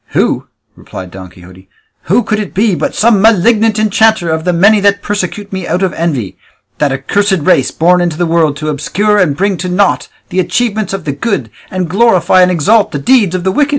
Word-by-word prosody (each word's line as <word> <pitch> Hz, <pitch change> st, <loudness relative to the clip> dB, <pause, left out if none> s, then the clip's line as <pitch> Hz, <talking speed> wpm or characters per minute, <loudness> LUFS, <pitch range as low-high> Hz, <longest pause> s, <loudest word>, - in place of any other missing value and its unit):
"Who?" -, -, 0 dB, 0.3 s
replied 90 Hz, -1 st, -10 dB
Don 95 Hz, 0 st, -10 dB
Quixote; 90 Hz, +2 st, -17 dB, 0.4 s
"who 215 Hz, +8 st, +2 dB
could 215 Hz, -1 st, -2 dB
it 205 Hz, -3 st, -6 dB
be 210 Hz, +1 st, +2 dB
but -, -, -3 dB
some 215 Hz, -3 st, +3 dB
malignant 220 Hz, +1 st, +3 dB
enchanter 215 Hz, -4 st, +2 dB
of 160 Hz, +1 st, -3 dB
the 180 Hz, -, +2 dB
many 200 Hz, +5 st, +4 dB
that 200 Hz, 0 st, +1 dB
persecute 205 Hz, 0 st, -4 dB
me 190 Hz, -2 st, -4 dB
out 180 Hz, +3 st, -1 dB
of 185 Hz, -4 st, -1 dB
envy 145 Hz, -, -3 dB, 0.4 s
that 150 Hz, -2 st, +1 dB
accursed 190 Hz, +9 st, 0 dB
race 135 Hz, -2 st, +2 dB
born 180 Hz, +2 st, +2 dB
into 170 Hz, -3 st, -2 dB
the 175 Hz, -, 0 dB
world 160 Hz, -3 st, +1 dB
to 155 Hz, +1 st, -4 dB
obscure 205 Hz, +8 st, 0 dB
and 150 Hz, -7 st, +1 dB
bring 195 Hz, 0 st, 0 dB
to 180 Hz, +2 st, -4 dB
naught 195 Hz, +2 st, 0 dB, 0.2 s
the 185 Hz, -, -2 dB
achievements 205 Hz, +3 st, -1 dB
of 195 Hz, -4 st, -5 dB
the 145 Hz, -, -1 dB
good, 140 Hz, -, -3 dB, 0.2 s
and 185 Hz, -2 st, -3 dB
glorify 185 Hz, -1 st, +3 dB
and 180 Hz, -, +4 dB
exalt 200 Hz, +6 st, +2 dB
the -, -, -3 dB
deeds 195 Hz, -, +2 dB
of 180 Hz, -, -3 dB
the 190 Hz, -, 0 dB
wicked? 290 Hz, +8 st, +1 dB
185 Hz, 210 wpm, -12 LUFS, 160-210 Hz, 0.4 s, many